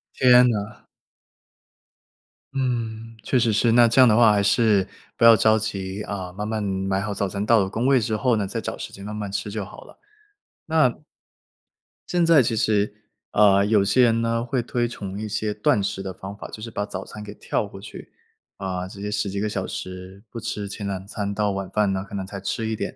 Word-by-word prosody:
天 125 -1 +6
呐！ 105 -1 -4 1.7
嗯， 115 -3 -3
确 130 - +1
实 115 -1 +2
是， 115 +2 +2
那 120 0 +6
这 115 +3 +2
样 130 - +8
的 110 - +4
话 115 -1 +6
还 100 -1 +2
是 105 -2 +3 0.3
不 - - +3
要 115 -1 +9
着 110 +1 +4
急 100 -2 -4
啊， 95 -3 -5
慢 105 +3 -4
慢 110 -1 -2
买 95 -1 -1
好 105 +1 -3
早 100 0 -1
餐 100 +1 -3
到 115 +1 +4
了 95 - +1
工 115 +6 -1
位 135 -2 +5
之 110 -1 -1
后 125 +2 +2
呢， 105 -2 -1
再 95 - -4
找 - - -5
时 - - -7
间 100 - -10
慢 105 +1 -6
慢 105 -2 -5
吃 105 - -3
就 105 -1 -4
好 - - -12
了。 - - -17 0.7
那 - - +3 1.2
现 175 -1 +2
在 165 -5 +6
其 115 -1 -1
实， 105 -1 +1 0.4
啊， 100 -1 +5
有 105 -1 +3
些 100 +6 +3
人 115 -1 +3
呢， 115 0 0
会 125 +1 -1
推 120 0 -1
崇 100 -4 -7
一 110 - -4
些 105 0 -2
断 105 0 +2
食 95 0 -3
的 95 -1 -5
方 95 +2 -8
法， - - -9
就 110 - -9
是 115 - -6
把 105 -2 -3
早 95 -2 -6
餐 105 - -9
给 105 -1 -8
跳 105 - -2
过 95 - -11
去。 105 - -11 0.5
啊， 95 -1 -4
直 100 +1 -11
接 105 0 -4
10 105 -1 -1
几 100 +1 -3
个 105 - -1
小 95 -2 -3
时 95 +2 -8
不 115 - -7
吃 105 -2 -4
前 100 0 -5
2 95 -1 -4
餐， 100 -1 -3
到 105 0 0
晚 95 -1 -4
饭 105 -2 +1
呢， 95 0 -2
可 100 - -8
能 95 -1 -3
才 95 +1 -7
吃 110 +3 -3
一 110 - -1
点， - - -4
105 Hz, 240 characters per minute, -23 LUFS, 100-115 Hz, 1.7 s, 要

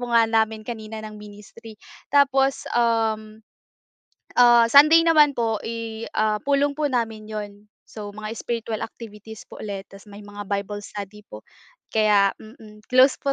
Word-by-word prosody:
po 245 - -5
nga 230 -1 +4
namin 220 -1 0
kanina 220 -1 -7
ng 215 -1 -10
ministry. 210 +2 -13 0.3
Tapos 275 -1 +2
um, 220 -2 0 0.9
ah, 240 -1 +6
Sunday 300 +6 +7
naman 300 -3 +5
po 230 -4 -1
i 230 -1 -5
ah, 215 0 +1
pulong 285 0 +1
po 305 -1 0
namin 225 -3 -2
'yon. 210 -1 -5 0.4
So 210 -2 -8
mga 215 +1 -7
spiritual 230 -2 -4
activities 220 -1 -11
po - - -11
ulit 200 -2 -6
tas 195 0 -15
may 200 +1 -11
mga 205 0 -9
Bible 205 +1 -4
study 205 +1 -9
po - - -11 0.5
kaya 210 -2 +3
mm. 215 -1 -15
Close 255 +2 +5
po 275 - -2
220 Hz, 155 wpm, -23 LUFS, 210-240 Hz, 0.9 s, Sunday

